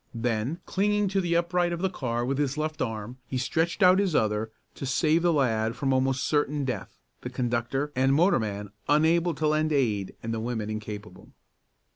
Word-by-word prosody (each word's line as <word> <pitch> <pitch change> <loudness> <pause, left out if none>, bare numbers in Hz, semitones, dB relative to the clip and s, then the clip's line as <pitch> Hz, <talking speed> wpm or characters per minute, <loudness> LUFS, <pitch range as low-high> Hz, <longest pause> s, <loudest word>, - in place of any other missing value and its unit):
Then, 115 +6 -1
clinging 205 +1 +1
to 195 0 +1
the 170 -2 0
upright 175 +1 +1
of 170 +1 -3
the - - +4
car 120 -6 -2
with 135 +2 -1
his 145 0 0
left 155 0 -3
arm, 115 +1 -4
he 130 - -3
stretched 165 +9 0
out 185 +1 +7
his 190 -6 +1
other 110 0 +1 0.2
to 135 - -6
save 155 +5 +2
the 175 0 +3
lad 115 -6 +1
from 135 +2 0
almost 130 0 +1
certain 145 -1 0
death, 120 -7 -4 0.2
the - - -5
conductor 125 +4 -1
and 130 +1 +3
motorman 110 - +1 0.2
unable 165 +3 +3
to 155 - -2
lend 155 +1 +1
aid 110 -9 0
and 115 0 -3
the 115 - -2
women 110 -2 -3
incapable. 105 -2 -8
135 Hz, 185 wpm, -27 LUFS, 115-165 Hz, 0.2 s, out